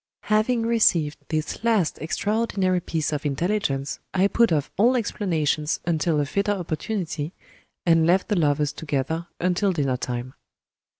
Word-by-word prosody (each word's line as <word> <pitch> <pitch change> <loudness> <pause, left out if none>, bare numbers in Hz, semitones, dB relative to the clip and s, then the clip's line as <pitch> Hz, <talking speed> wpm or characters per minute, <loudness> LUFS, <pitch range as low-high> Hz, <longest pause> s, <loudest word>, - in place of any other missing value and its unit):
Having 225 +2 +2
received 175 -10 +2
this 155 +6 -3
last 220 -8 +1
extraordinary 195 +1 0
piece 160 -3 -2
of 150 - -2
intelligence, 145 -2 -1 0.2
I 190 +1 +4
put 235 -1 +3
off 150 -3 0
all 240 +6 +4
explanations 160 - 0
until 160 -2 +1
a 145 - +1
fitter 200 +7 0
opportunity, 170 -2 -3 0.5
and 165 -2 +4
left 185 +2 +3
the 210 - +2
lovers 150 -3 +1
together 160 +3 -2
until 185 +3 +1
dinner 140 -7 0
time. 125 +1 -4
170 Hz, 135 wpm, -24 LUFS, 150-200 Hz, 0.5 s, I